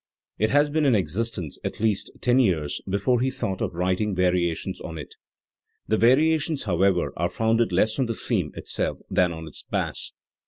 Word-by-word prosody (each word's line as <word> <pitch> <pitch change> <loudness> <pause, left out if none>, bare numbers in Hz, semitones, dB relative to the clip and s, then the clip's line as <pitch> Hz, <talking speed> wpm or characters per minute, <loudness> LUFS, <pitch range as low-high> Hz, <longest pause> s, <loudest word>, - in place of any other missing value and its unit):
It 110 - +2
had 145 +1 +3
been 155 -1 +2
in 135 -5 +4
existence 95 -2 -2
at - - -4
least 110 -2 +1
ten 125 +1 +3
years 85 - +1
before 100 +6 +1
he 130 - +2
thought 100 -8 -3
of - - -2
writing 95 +3 0
variations 90 -2 0
on 80 - -6
it, 75 - -8 0.7
The 110 - +2
variations, 150 +6 +3
however, 95 -1 +1
are 85 +1 0
founded 115 -1 +1
less 105 +7 +1
on 130 - +2
the 115 - -2
theme 95 -11 -1
itself - - -2
than 90 -1 +3
on 80 -1 -7
its - - -7
bass. - - -3
105 Hz, 180 wpm, -25 LUFS, 90-125 Hz, 0.7 s, in